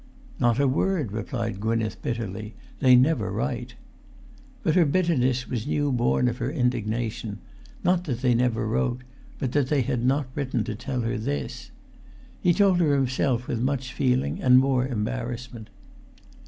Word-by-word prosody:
"Not 120 Hz, +1 st, +2 dB
a 140 Hz, -, +4 dB
word," 150 Hz, -, 0 dB
replied 115 Hz, -1 st, -3 dB
Gwynneth, 110 Hz, +1 st, -1 dB
bitterly. 110 Hz, -2 st, -4 dB, 0.2 s
"They 130 Hz, -2 st, +6 dB
never 125 Hz, -3 st, +3 dB
write." -, -, -3 dB, 0.9 s
But 160 Hz, -, +2 dB
her 180 Hz, -, +5 dB
bitterness 140 Hz, -6 st, +1 dB
was 120 Hz, 0 st, -3 dB
new 145 Hz, -1 st, 0 dB
born 125 Hz, 0 st, +2 dB
of 120 Hz, 0 st, -1 dB
her 125 Hz, +2 st, -1 dB
indigna[Pg 125 Hz, -7 st, 0 dB
369]tion, 110 Hz, -2 st, -3 dB, 0.5 s
not 180 Hz, 0 st, +2 dB
that 125 Hz, -6 st, -3 dB
they 125 Hz, -2 st, +3 dB
never 120 Hz, -2 st, +1 dB
wrote, 120 Hz, +3 st, -1 dB, 0.3 s
but 130 Hz, -, -2 dB
that 145 Hz, -2 st, +1 dB
they 145 Hz, -4 st, +2 dB
had 120 Hz, +1 st, -1 dB
not 135 Hz, +3 st, +2 dB
written 130 Hz, -5 st, -1 dB
to 110 Hz, -, -4 dB
tell 125 Hz, +4 st, -3 dB
her 115 Hz, 0 st, -2 dB
this. 70 Hz, -, -4 dB, 0.7 s
He 175 Hz, -, +4 dB
told 190 Hz, 0 st, +4 dB
her 150 Hz, -4 st, +3 dB
himself 130 Hz, -2 st, 0 dB
with 115 Hz, -, -2 dB
much 130 Hz, 0 st, -1 dB
feeling 130 Hz, -1 st, 0 dB
and 125 Hz, -1 st, +6 dB
more 130 Hz, -1 st, +3 dB
embarrassment. 120 Hz, -1 st, -4 dB
125 Hz, 160 wpm, -25 LUFS, 115-135 Hz, 0.9 s, They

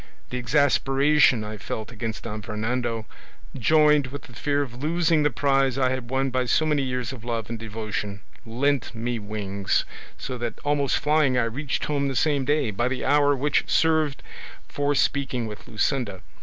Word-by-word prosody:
The 125 Hz, -, -2 dB
exasperation 135 Hz, +1 st, +3 dB
I 105 Hz, 0 st, -6 dB
felt 110 Hz, +3 st, -5 dB
against 115 Hz, -1 st, -5 dB
Don 105 Hz, -1 st, -5 dB
Fernando, 110 Hz, +2 st, -2 dB, 0.5 s
joined 150 Hz, +1 st, +4 dB
with 140 Hz, +2 st, -8 dB
the 120 Hz, -, -14 dB
fear 145 Hz, +4 st, 0 dB
of 125 Hz, -2 st, -9 dB
losing 165 Hz, 0 st, +2 dB
the 150 Hz, -, +3 dB
prize 135 Hz, -2 st, +1 dB
I 130 Hz, -1 st, +2 dB
had 130 Hz, -2 st, -4 dB
won 135 Hz, +1 st, 0 dB
by 130 Hz, 0 st, 0 dB
so 155 Hz, +5 st, +2 dB
many 150 Hz, -2 st, +2 dB
years 125 Hz, -2 st, -2 dB
of 120 Hz, -4 st, -10 dB
love 115 Hz, -2 st, -3 dB
and 115 Hz, -, -4 dB
devotion, 105 Hz, -2 st, -4 dB, 0.2 s
lent 130 Hz, +3 st, -1 dB
me 120 Hz, +1 st, -2 dB
wings; 100 Hz, -2 st, -1 dB, 0.3 s
so 130 Hz, -2 st, -5 dB
that 120 Hz, -1 st, -3 dB
almost 145 Hz, -2 st, +1 dB
flying 150 Hz, -4 st, +2 dB
I 125 Hz, -, +3 dB
reached 130 Hz, +5 st, -2 dB
home 140 Hz, -2 st, 0 dB
the 135 Hz, -, -2 dB
same 145 Hz, -1 st, +2 dB
day, 145 Hz, -5 st, +1 dB
by 120 Hz, +5 st, 0 dB
the 130 Hz, 0 st, -2 dB
hour 145 Hz, +1 st, +4 dB
which 140 Hz, +2 st, 0 dB
served 160 Hz, -3 st, +2 dB, 0.4 s
for 145 Hz, 0 st, 0 dB
speaking 130 Hz, -3 st, 0 dB
with 105 Hz, -1 st, -8 dB
Luscinda. 110 Hz, -3 st, -1 dB
130 Hz, 175 wpm, -25 LUFS, 115-145 Hz, 0.5 s, joined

